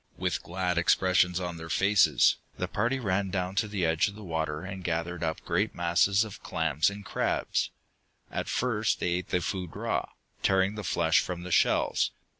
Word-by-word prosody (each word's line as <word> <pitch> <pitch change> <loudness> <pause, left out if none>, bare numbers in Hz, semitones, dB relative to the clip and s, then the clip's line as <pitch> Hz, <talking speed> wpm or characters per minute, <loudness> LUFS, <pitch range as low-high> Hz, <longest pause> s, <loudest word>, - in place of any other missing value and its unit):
With - - -1
glad 90 -1 -1
expressions 90 0 +3
on 90 -2 -4
their 80 0 -8
faces, 100 +4 +4 0.2
the - - -2
party 135 +3 0
ran 100 -4 0
down 90 0 -2
to 110 - +2
the 100 -4 -1
edge 80 -1 +2
of 100 - -7
the 105 - -10
water 80 -3 -2
and 95 -1 -7
gathered 85 0 -2
up 80 -1 -2
great - - -1
masses 85 +4 +3
of 110 -3 -9
clams 75 +7 +1
and 100 0 -9
crabs. - - 0 0.6
At - - -3
first 110 -4 0
they - - 0
ate 90 +1 -2
the 90 - +1
food 90 -2 -4
raw, - - -2 0.3
tearing 95 +1 +2
the 105 -1 -6
flesh 85 -2 +3
from 90 -1 -4
the 90 - -7
shells. 80 - +3
90 Hz, 185 wpm, -28 LUFS, 85-100 Hz, 0.6 s, faces